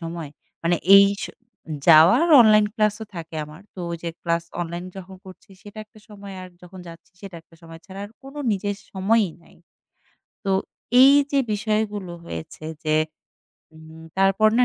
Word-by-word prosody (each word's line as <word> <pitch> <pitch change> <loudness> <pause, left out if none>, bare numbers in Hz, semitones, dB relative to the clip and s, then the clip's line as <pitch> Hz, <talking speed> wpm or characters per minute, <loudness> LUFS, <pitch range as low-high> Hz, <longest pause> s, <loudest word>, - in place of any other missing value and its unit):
সময় 165 -2 -6 0.3
মানে 170 +1 +1 0.2
এই 200 - +8 0.2
স - - -2 0.6
যাওয়া 165 +2 +8
আর 340 - 0
অনলাইন 215 -2 +5
ক্লাসও 215 +1 0
থাকে 165 -1 -8
আমার। 150 +5 -14
তো 185 - -8
ওইযে 170 0 -5
ক্লাস 170 -1 -1 0.2
অনলাইনে 175 +2 -5
যখন 190 0 -11
করছি 185 +1 -15
সেটা 205 +1 -12
একটা 215 +1 -21
সময় 200 -2 -11
আর 185 - -10
যখন 180 +1 -12
যাচ্ছি 165 0 -14
সেটা 195 -4 -10
একটা 165 - -24
সময় 165 0 -12
ছাড়া 195 0 -9
আর 205 - -11
কোন 270 +2 -12 0.2
নিজের 205 0 -3 0.2
সময়ই 200 0 +1
নাই। - - -22 0.9
তো 195 - -1 0.5
এইযে 280 +1 +5 0.2
বিষয়গুলো 210 -3 -2
হয়েছে 160 -1 -8 0.2
যে 155 0 0 0.8
উম 160 0 -14 0.2
তারপর 195 +3 +4
না 250 - +5
190 Hz, 160 wpm, -22 LUFS, 170-210 Hz, 0.9 s, এই